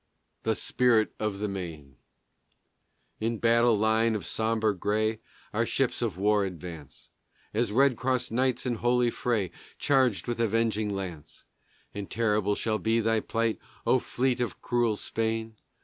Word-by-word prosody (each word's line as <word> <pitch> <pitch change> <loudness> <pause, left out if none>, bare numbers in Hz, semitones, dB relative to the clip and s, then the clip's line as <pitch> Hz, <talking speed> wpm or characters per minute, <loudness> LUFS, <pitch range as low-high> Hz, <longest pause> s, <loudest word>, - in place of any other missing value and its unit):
THE - - 0
SPIRIT 115 -3 +2
OF 105 -2 -1
THE 105 +1 -2
MAINE 80 -8 -7 1.2
In 115 +1 -1
battle 115 0 +4
line 110 +1 +2
of 105 - -4
sombre 110 -1 0
gray 110 +3 0 0.3
Our 110 +2 +2
ships 130 +2 0
of 110 -7 -1
war 105 +1 +3
advance, 85 -5 -8 0.4
As 115 0 +1
Red 130 +1 +4
Cross 130 -1 0
Knights 130 +2 +1
in 120 -2 -1
holy 120 +1 +2
fray 110 -8 -1 0.3
Charged 130 -7 +2
with 120 -1 -3
avenging 110 -1 +1
lance. 95 -6 -6 0.5
And 100 -1 -6
terrible 105 -3 +1
shall 110 0 -1
be 115 +1 +2
thy 115 0 +2
plight, 115 0 -1 0.3
O 130 - +4
fleet 125 +1 -1
of 115 -7 -3
cruel 120 -3 +1
Spain! 110 +1 -2
110 Hz, 145 wpm, -28 LUFS, 105-120 Hz, 1.2 s, battle